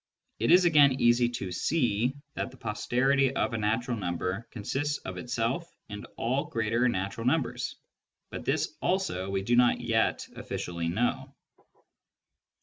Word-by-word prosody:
It 115 - +1
is 180 +1 +7
again 145 -5 +5
easy 120 0 +4
to 100 -6 -5
see 125 - 0 0.2
that - - -3
the - - -16
posterity 130 +5 +1
of - - 0
a - - 0
natural 115 +4 0
number 90 +2 -3
con 105 - -8
sists 145 +6 -1
of - - -5
itself 125 +7 -2 0.2
and 105 0 -7
all 130 +4 0
greater 115 +2 +1
natural 100 +2 -2
numbers; 145 0 0 0.6
but - - -6
this - - -1
also 175 - -1
we 95 0 -1
do 120 +4 +2
not 120 0 +4
yet 115 -2 0
officially 85 -1 -4
know. 110 +8 -1
120 Hz, 145 wpm, -28 LUFS, 105-135 Hz, 0.6 s, is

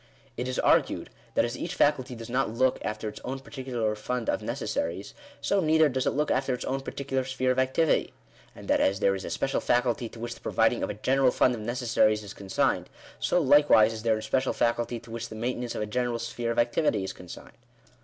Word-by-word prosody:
It 125 +2 -3
is 130 - -3
argued, - - +2 0.2
that - - +4
as 120 +1 -4
each 175 +1 -4
faculty 135 -5 +2
does 115 -1 -8
not 130 +1 0
look 125 +3 +1
after 110 0 -3
its 105 0 -6
own 130 +2 -3
particular 130 -5 -3
fund 115 +2 -3
of - - -2
necessaries, 90 +4 -3 0.3
so 200 - +1
neither 160 -2 +4
does 130 -1 -1
it - - 0
look 150 +1 +1
after 130 0 +1
its 125 - -6
own 135 +1 -2
particular 135 -1 -3
sphere 130 0 0
of 130 - 0
activity; 130 +5 +2 0.4
and - - -11
that - - +3
as 95 +1 +2
there 100 - +3
is 95 -1 -4
a - - -4
special 135 - -1
faculty 120 -1 +1
to 115 - -13
which 120 +1 -4
the - - -16
providing 115 +1 +2
of - - -1
a - - -4
general 130 +4 +3
fund 125 0 +3
of 115 - -5
necessaries 115 -2 +1
is 100 - -8
consigned, 95 -1 -1 0.3
so - - +2
likewise 135 -6 +5
is 110 - -6
there 110 -1 +2
a 110 - -6
special 130 0 0
faculty 120 0 0
to 115 0 -14
which 115 0 -5
the 110 - -8
maintenance 120 +1 -3
of - - -2
a - - -2
general 120 +2 -1
sphere 115 0 -4
of 115 - -2
activity 120 -3 +2
is 95 - -4
consigned. 90 -1 -11
120 Hz, 225 wpm, -27 LUFS, 110-130 Hz, 0.4 s, likewise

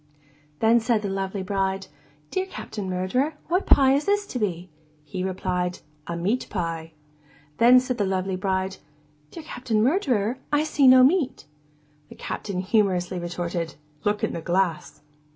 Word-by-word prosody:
Then 225 +1 +5
said 225 -2 +1
the 200 - -2
lovely 195 0 -3
bride, 195 0 -1 0.5
'Dear 375 0 -1
Captain 205 - -6
Murderer, 220 +12 0
what 360 +3 +1
pie 270 -1 +6
is 285 +2 +1
this 410 0 +1
to 255 - -5
be?' 180 -4 -2 0.4
He 180 +5 -5
replied, 180 -1 -2 0.3
'A 170 - -3
meat 205 +9 -1
pie.' 165 -3 -4 0.7
Then 245 +2 +8
said 250 -1 -3
the 205 - +2
lovely 190 0 -1
bride, 190 0 -1 0.5
'Dear 330 - -9
Captain 245 -7 -1
Murderer, 255 - +1
I 295 +1 +3
see 295 -3 +3
no 255 0 +8
meat.' 290 0 +2 0.6
The - - -12
Captain 190 -3 -4
humorously 185 -3 +1
retorted, 175 -1 -4 0.3
'Look 205 0 0
in - - 0
the 170 - -4
glass. 180 -1 -1
200 Hz, 150 wpm, -25 LUFS, 185-255 Hz, 0.7 s, Then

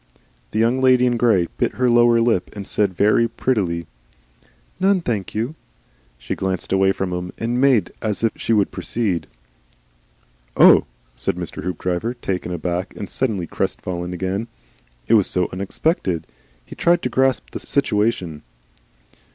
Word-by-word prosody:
The - - -5
Young 115 +4 +2
Lady 130 -1 +5
in 120 -1 +2
Grey 110 -8 +3
bit - - +1
her 125 - +1
lower 120 -1 +5
lip 115 -5 +1
and 100 -2 -7
said 100 -3 0
very 105 +5 +3
prettily, 95 -9 -1 0.9
"None, 190 0 +3
thank 110 - -3
you." 115 +7 -1 0.6
She - - -4
glanced 95 -1 -2
away 95 0 +4
from 95 -1 -3
him 90 0 -4
and 120 +2 -1
made 130 -9 +3
as 110 0 -2
if 115 - +3
she - - -3
would 105 -3 +3
proceed. 95 - -2 1.3
"Oh!" - - +7 0.3
said - - -2
Mr. - - -5
Hoopdriver, 90 +6 -2
taken 95 -6 -3
aback 90 +2 -3
and 100 - -7
suddenly 110 -9 -1
crestfallen 90 +1 -3
again. 95 +5 -3 0.6
It - - +3
was 105 -4 +5
so 90 -1 0
unexpected. 95 - -1 0.4
He - - -11
tried 175 +1 +2
to 125 - 0
grasp 130 +1 +1
the - - -5
situation. 105 - 0
105 Hz, 150 wpm, -21 LUFS, 90-120 Hz, 1.3 s, Oh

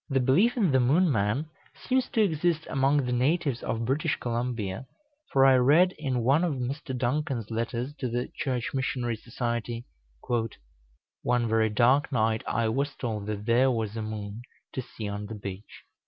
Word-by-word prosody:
The 135 -1 +2
belief 180 - +3
in 195 -9 +3
the 130 - +4
Moon 150 +8 +4
man 110 +6 +1 0.4
seems 260 0 +2
to 220 - +3
exist 165 -2 +1
among 140 0 +2
the 125 - -2
natives 135 +1 +1
of 115 0 -2
British 150 +5 +1
Columbia; 120 -2 -3 0.4
for 135 0 +5
I 135 -1 +7
read 150 +9 +5
in 130 -5 -1
one 140 +8 +4
of 165 -5 0
Mr. 130 +1 -4
Duncan's 125 -3 -1
letters 115 +4 -2
to 125 - -2
the 120 +1 -2
Church 130 -7 -2
Missionary 125 -3 -1
Society, 120 +1 -3 1.4
"One 120 -1 +1
very 110 0 +2
dark 125 +7 +3
night 110 -3 +1
I 115 -1 +1
was 140 +5 -1
told 110 -5 -4
that 105 -1 -4
there 120 +3 +4
was 110 -4 -1
a 110 - -3
moon 110 0 -5 0.3
to 130 - -2
see 110 -3 -7
on 105 0 -4
the 110 - -6
beach. 100 0 -8
125 Hz, 170 wpm, -27 LUFS, 115-140 Hz, 1.4 s, I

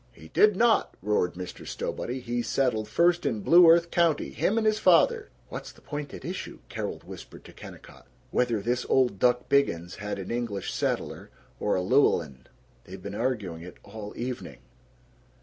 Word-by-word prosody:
"He 80 -7 -14
did 210 - +4
not!" 230 +2 +2
roared 105 -4 0
Mr. 90 0 -7
Stowbody. 125 +2 -4
"He 120 0 -2
settled 115 -2 0
first 175 +1 +2
in 110 -3 -1
Blue 170 - +7
Earth 170 +1 +5
County, 165 -4 +2
him 220 - 0
and 225 - +1
his 215 0 +2
father!" 460 - +4 0.2
("What's - - -7
the - - -20
point 145 -1 -6
at - - -9
issue?") - - -5
Carol - - -4
whispered - - -11
to - - -13
Kennicott. - - -13 0.2
("Whether 120 -4 +1
this 120 +4 -1
old 125 -7 +2
duck 125 +1 +2
Biggins 90 -11 +1
had 105 +1 -4
an 95 - -6
English 115 -5 -3
setter - - -3 0.3
or 105 - +1
a 90 - 0
Llewellyn. 65 -7 +1 0.4
They've 95 +1 -9
been 100 +2 -7
arguing 105 -8 -2
it 90 +1 -11
all 105 0 -8
evening!") 125 +1 -5
120 Hz, 170 wpm, -27 LUFS, 100-150 Hz, 0.4 s, Blue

